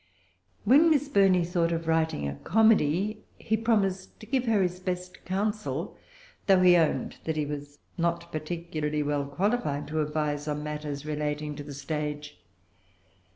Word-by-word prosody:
When 290 +9 +6
Miss 295 -2 +2
Burney 195 -8 +4
thought 170 -1 0
of 165 -1 -2
writing 160 - +1
a 70 - -3
comedy, 210 - +2 0.2
he 220 - 0
promised 205 -4 0
to - - -9
give 255 +2 0
her 215 -4 +3
his 180 0 -2
best 180 -1 -5
counsel, 210 +3 -2 0.5
though 190 -2 +5
he 180 -1 +7
owned 165 -3 +1
that 160 - -1
he 150 - 0
was 145 0 -6 0.2
not 170 0 -1
particularly 155 -1 -3
well 145 -1 -1
qualified 150 -2 -1
to 155 0 0
advise 150 -1 -2
on 150 0 -2
matters 150 -1 -5
relating 150 0 -2
to 145 - -7
the 145 -1 -8
stage. 150 +1 -4
165 Hz, 155 wpm, -28 LUFS, 150-195 Hz, 0.5 s, he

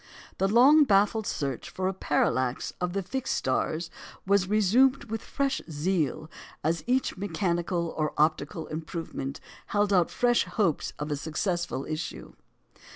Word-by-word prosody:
The 195 - +3
long 265 +9 +7
baffled 210 -2 +2
search 135 -4 -3
for 185 0 -2
a 190 - 0
parallax 130 -7 0
of 180 0 -1
the 195 0 -1
fixed 265 +7 -2
stars 155 +5 -1 0.3
was 195 -1 +2
resumed 230 +6 +4
with 225 -1 -2
fresh 275 -1 -1
zeal 155 -1 -1 0.4
as 165 +2 0
each 255 -3 +1
mechanical 175 -3 -1
or 155 -1 0
optical 155 +1 +1
improvement 155 -3 -5 0.3
held 205 -1 +1
out 180 -3 +4
fresh 240 -1 +2
hopes 185 -9 0
of 150 +1 -4
a - - +1
successful 165 0 -2
issue. 155 0 -5
180 Hz, 140 wpm, -28 LUFS, 155-205 Hz, 0.4 s, long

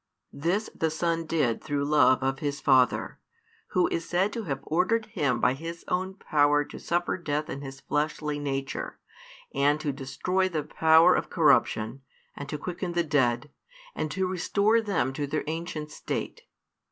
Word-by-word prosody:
This 175 +9 -1
the 160 - 0
Son 165 +1 -1
did 145 -9 0
through 145 -2 -1
love 145 -3 +4
of 135 0 0
His 145 -1 -2
Father, 130 -2 +2 0.5
Who 180 - +2
is 165 - -2
said 185 +4 0
to 230 -3 -4
have 135 -5 -3
ordered 190 +8 +1
Him 145 - 0
by 125 - +3
His 165 +4 -7
own 185 +1 -1
power 145 -5 +2
to - - -10
suffer 175 +2 -1
death 150 -2 -2
in 140 - -5
His 135 -1 -9
fleshly 150 0 -1
nature, 135 -1 -3 0.6
and 145 +2 +2
to 145 -2 -2
destroy 180 +8 -1
the 155 -4 -2
power 160 +3 +5
of - - -1
corruption, 135 -6 +2 0.3
and 140 0 -7
to 150 - -3
quicken 175 +3 -4
the 170 0 +2
dead, 140 -3 +1 0.4
and 155 - -3
to 190 +3 -1
restore 200 +5 +2
them 185 - 0
to 145 +1 -3
their 150 +2 -2
ancient 155 -1 -4
state. - - -5
155 Hz, 165 wpm, -27 LUFS, 140-175 Hz, 0.6 s, power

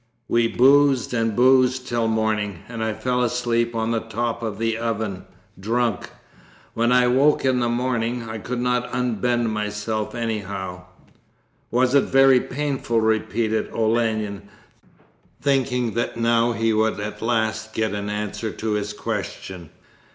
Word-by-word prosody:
We 115 0 +2
boozed 135 +1 +4
and 115 -3 0
boozed 130 +1 +4
till 120 -1 0
morning, 110 -4 -1
and 115 -1 -5
I 110 - 0
fell 125 +3 -1
asleep 120 -1 0
on 110 0 -1
the 115 - +1
top 115 +1 -3
of 110 -3 -4
the 115 0 0
oven, 110 -4 -3 0.3
drunk. 115 +1 -1 0.6
When 115 +1 +1
I 125 0 +5
woke 135 +4 +3
in 130 -1 +2
the 120 -1 +1
morning 120 -1 -1
I 110 0 -5
could 125 +4 -4
not 125 0 0
unbend 120 -1 0
myself 105 +1 -3
anyhow 100 -6 -4 0.4
' - - -41
'Was 125 +2 +2
it 140 - +5
very 135 -1 +5
painful?' 135 -4 -1
repeated 110 0 0
Olenin, 110 -3 -1 0.9
thinking 125 -4 0
that 120 0 -2
now 115 0 +2
he 115 0 +1
would 110 0 +1
at 105 +1 -5
last 110 -1 -1
get 110 -2 0
an 100 0 -3
answer 105 +2 -3
to 110 0 -4
his 105 0 -2
question. 90 -4 -5
115 Hz, 145 wpm, -23 LUFS, 110-125 Hz, 0.9 s, I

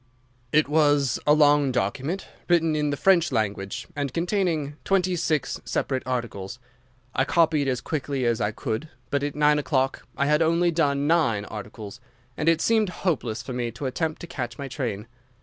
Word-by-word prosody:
"It 155 -1 +4
was 145 -4 +3
a 150 - +7
long 145 -2 +4
document, 130 - -2 0.2
written 165 -2 +3
in 150 -1 0
the 145 - -2
French 175 -3 +4
language, 100 -4 -2
and 140 -2 -2
containing 165 - -1
twenty 185 -2 +1
six 160 -3 -1
separate 130 -2 -1
articles. 115 -5 -3 0.6
I 130 - +2
copied 155 -2 +2
as 125 -2 0
quickly 140 -4 -2
as 120 -1 +1
I 105 - +1
could, 110 +7 -4 0.2
but 140 - +1
at 145 0 -3
nine 150 0 +4
o'clock 135 -2 -1
I 140 - +2
had 150 +2 +3
only 170 +2 +3
done 145 -4 +1
nine 130 -11 +2
articles, 105 +1 -8 0.4
and 155 - +1
it 165 0 +2
seemed 220 -3 +3 0.2
hopeless 120 - -1
for 130 - -6
me 120 -1 -2
to 135 - -6
attempt 155 +4 -2
to - - -5
catch 120 -6 -5
my 140 - -5
train. 115 -7 -4
145 Hz, 175 wpm, -25 LUFS, 125-160 Hz, 0.6 s, a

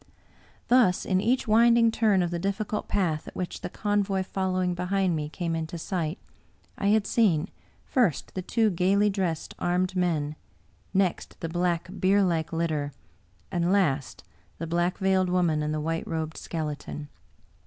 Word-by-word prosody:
Thus, 240 -8 +4
in 185 -1 +2
each 250 +4 +1
winding 230 +1 +5
turn 210 -5 +3
of 175 - -2
the 170 - -2
difficult 200 +3 -2
path 165 -6 0
at - - -10
which 180 - -4
the - - -4
convoy 205 -1 0
fol 190 0 -2
lowing 185 -1 +1
behind 180 0 0
me 150 -1 -3
came 165 +1 -3
into 160 +1 -4
sight, 165 0 -2 0.6
I 200 - -1
had 210 0 +3
seen, 190 -6 +2 0.4
first, 235 - +1
the 185 - -3
two 220 +3 +1
gayly 195 +4 +3
dressed, 180 -5 -2
armed 180 +1 0
men, 155 -5 0 0.5
next 190 -3 0
the 165 - -4
black, 175 0 0
bierlike 185 -4 +2
litter, 155 -4 -1 0.6
and 175 0 +1
last 150 -9 +1 0.3
the 165 - -4
Black 175 +2 0
veiled 190 -1 +2
Woman 175 -4 +2
and 150 0 -1
the 155 - -1
White 165 +2 -2
robed 160 -1 -3
Skeleton. 150 -2 -5
180 Hz, 155 wpm, -27 LUFS, 165-195 Hz, 0.6 s, winding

